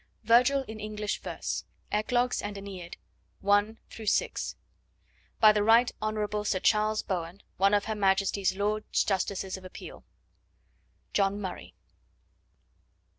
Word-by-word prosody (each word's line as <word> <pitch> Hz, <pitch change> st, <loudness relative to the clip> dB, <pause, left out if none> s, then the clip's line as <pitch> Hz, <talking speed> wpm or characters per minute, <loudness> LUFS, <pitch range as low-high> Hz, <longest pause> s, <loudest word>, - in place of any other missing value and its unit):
Virgil 250 Hz, +5 st, +4 dB
in 220 Hz, 0 st, -8 dB
English 210 Hz, 0 st, -3 dB
Verse. -, -, -4 dB, 0.3 s
Eclogues 245 Hz, +4 st, +1 dB
and 205 Hz, -1 st, -5 dB
AEneid 190 Hz, -3 st, -8 dB, 0.5 s
I. 205 Hz, +2 st, +3 dB, 0.2 s
VI. 220 Hz, -2 st, 0 dB, 1.1 s
By 215 Hz, -1 st, +8 dB
the 210 Hz, -1 st, +1 dB
Right 230 Hz, +3 st, +5 dB
Hon. 210 Hz, -1 st, -1 dB
Sir 200 Hz, -2 st, 0 dB
Charles 215 Hz, +2 st, +2 dB
Bowen, 175 Hz, 0 st, -4 dB
one 195 Hz, +2 st, +4 dB
of 205 Hz, -, +1 dB
Her 220 Hz, -, -2 dB
Majesty's 195 Hz, -1 st, +1 dB
Lords 210 Hz, +2 st, 0 dB
Justices 190 Hz, -1 st, -1 dB
of 190 Hz, -, -13 dB
Appeal. 185 Hz, -, -10 dB, 1.1 s
(John 200 Hz, 0 st, +1 dB
Murray.) 190 Hz, -3 st, -7 dB
205 Hz, 120 wpm, -29 LUFS, 195-215 Hz, 1.1 s, By